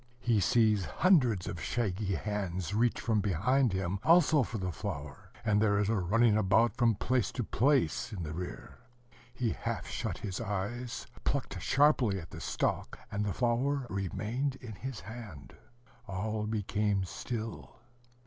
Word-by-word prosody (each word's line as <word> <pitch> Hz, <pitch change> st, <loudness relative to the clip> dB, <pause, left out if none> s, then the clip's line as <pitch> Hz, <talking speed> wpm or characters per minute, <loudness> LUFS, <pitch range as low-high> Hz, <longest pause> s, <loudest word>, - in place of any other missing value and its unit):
He 115 Hz, -3 st, +2 dB
sees 105 Hz, -1 st, +3 dB
hundreds 125 Hz, -, +3 dB
of 85 Hz, -, -5 dB
shaggy 100 Hz, -4 st, -1 dB
hands 95 Hz, -2 st, -3 dB
reach 115 Hz, +3 st, +2 dB
from 110 Hz, -3 st, +1 dB
behind 110 Hz, -, +2 dB
him, 95 Hz, 0 st, -1 dB
also 160 Hz, -3 st, +5 dB
for 115 Hz, -1 st, -3 dB
the 95 Hz, -2 st, -2 dB
flower; 80 Hz, -8 st, -6 dB, 0.2 s
and 105 Hz, -1 st, +3 dB
there 100 Hz, -2 st, +3 dB
is 105 Hz, 0 st, +1 dB
a 115 Hz, -, +2 dB
running 105 Hz, +5 st, +3 dB
about 110 Hz, +2 st, +3 dB
from 120 Hz, -3 st, +3 dB
place 125 Hz, +4 st, 0 dB
to 125 Hz, -, -2 dB
place, 125 Hz, 0 st, +1 dB
in 95 Hz, -5 st, -4 dB
the 80 Hz, -1 st, -5 dB
rear. 90 Hz, +2 st, -7 dB, 0.5 s
He 120 Hz, -2 st, -1 dB
half -, -, -3 dB
shut -, -, -3 dB
his 95 Hz, 0 st, -4 dB
eyes, 115 Hz, +3 st, -3 dB, 0.2 s
plucked 105 Hz, -10 st, -2 dB
sharply 135 Hz, -8 st, +3 dB
at 80 Hz, -2 st, -11 dB
the -, -, -8 dB
stalk, -, -, -1 dB
and 100 Hz, +1 st, -1 dB
the 105 Hz, -, -1 dB
flower 130 Hz, +5 st, +1 dB
remained 110 Hz, +8 st, -2 dB
in 120 Hz, -4 st, -9 dB
his 120 Hz, +4 st, -6 dB
hand. 105 Hz, -, -9 dB, 0.5 s
All 105 Hz, +2 st, -2 dB
became 105 Hz, -2 st, 0 dB
still. 110 Hz, +4 st, -5 dB
110 Hz, 155 wpm, -31 LUFS, 95-120 Hz, 0.5 s, also